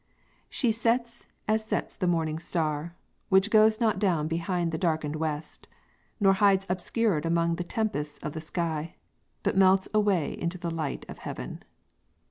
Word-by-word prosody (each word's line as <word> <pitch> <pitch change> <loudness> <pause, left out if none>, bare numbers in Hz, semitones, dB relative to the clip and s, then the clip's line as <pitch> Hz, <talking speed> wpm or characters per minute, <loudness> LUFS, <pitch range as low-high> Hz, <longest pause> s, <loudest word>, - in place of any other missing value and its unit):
"She 245 -4 +1
set 235 +1 0 0.3
as 220 0 +2
sets 215 - -2
the 185 - -1
morning 160 -2 0
star, 165 -1 -2 0.3
which 190 +2 +4
goes 215 0 +5
Not 220 -5 +2
down 170 -7 +1
behind 170 +1 -1
the 160 - -3
darkened 155 -3 0
west, 155 -1 -4 0.5
nor 195 -2 +5
hides 195 -1 +3
Obscured 185 -1 0
among 170 0 +1
the 175 - -2
tempests 175 -7 -2
of 150 - -4
the 160 - -5
sky, 160 -1 -3 0.5
But - - +1
melts 190 0 +5
away 205 -7 +2
into 170 +1 -1
the 170 -1 -4
light 160 -3 -3
of - - -9
heaven." - - -6
175 Hz, 155 wpm, -28 LUFS, 160-205 Hz, 0.5 s, goes